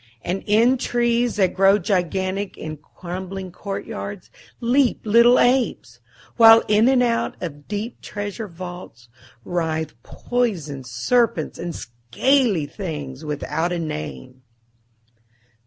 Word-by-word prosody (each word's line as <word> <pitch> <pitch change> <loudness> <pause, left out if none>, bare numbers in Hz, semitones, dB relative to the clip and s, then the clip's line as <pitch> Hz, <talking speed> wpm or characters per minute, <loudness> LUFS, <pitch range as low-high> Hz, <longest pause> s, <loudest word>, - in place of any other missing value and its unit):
And 185 +2 -3
in 230 +5 +4
trees 240 -1 +1
that 190 -3 +2
grow 195 +1 +5
gigantic 190 +1 -1
in 155 -1 -6
crumbling 185 +4 -7
courtyards 200 +1 -6 0.3
leap 245 +2 +2
little 235 +3 +6
apes, 250 0 +1 0.4
while 225 -1 +8
in 215 +3 +4
and 260 -2 +4
out 235 -1 0
of 145 -4 -7
deep 215 +3 -5
treasure 205 +2 -5
vaults 175 - -10 0.4
writhe 160 -3 -2
poison 175 - -2
serpents 155 - 0
and 170 -1 -5
scaly 160 - 0
things 145 -6 -6
without 155 +3 -2
a 175 - -1
name. 75 - -6
190 Hz, 110 wpm, -22 LUFS, 160-230 Hz, 0.4 s, while